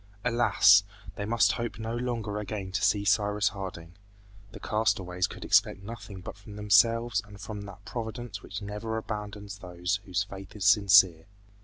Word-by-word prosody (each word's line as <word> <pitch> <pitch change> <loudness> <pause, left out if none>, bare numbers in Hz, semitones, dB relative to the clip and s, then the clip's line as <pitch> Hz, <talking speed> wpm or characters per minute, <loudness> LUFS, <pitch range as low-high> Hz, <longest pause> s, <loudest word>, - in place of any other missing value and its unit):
Alas! 115 -4 +5 0.3
they 105 - -4
must 110 -3 +3
hope 115 +4 -4
no 110 +1 -4
longer 115 -4 -3
again 100 -2 -5
to 100 +1 -1
see 100 0 +2
Cyrus 105 0 +2
Harding. 90 -4 -8 0.6
The - - -10
castaways 95 -5 0
could - - -9
expect 100 - +3
nothing 100 -3 -9
but 95 - -8
from 105 0 -12
themselves 110 +2 +3
and 105 -1 -14
from 105 +1 -6
that 100 - -12
Providence 115 -3 -6
which 100 +2 -7
never 105 +2 -4
abandons 105 -2 -6
those 90 +1 -2
whose 95 +1 0
faith 95 0 -11
is 100 -2 -4
sincere. 100 -5 +5
105 Hz, 160 wpm, -28 LUFS, 95-110 Hz, 0.6 s, Alas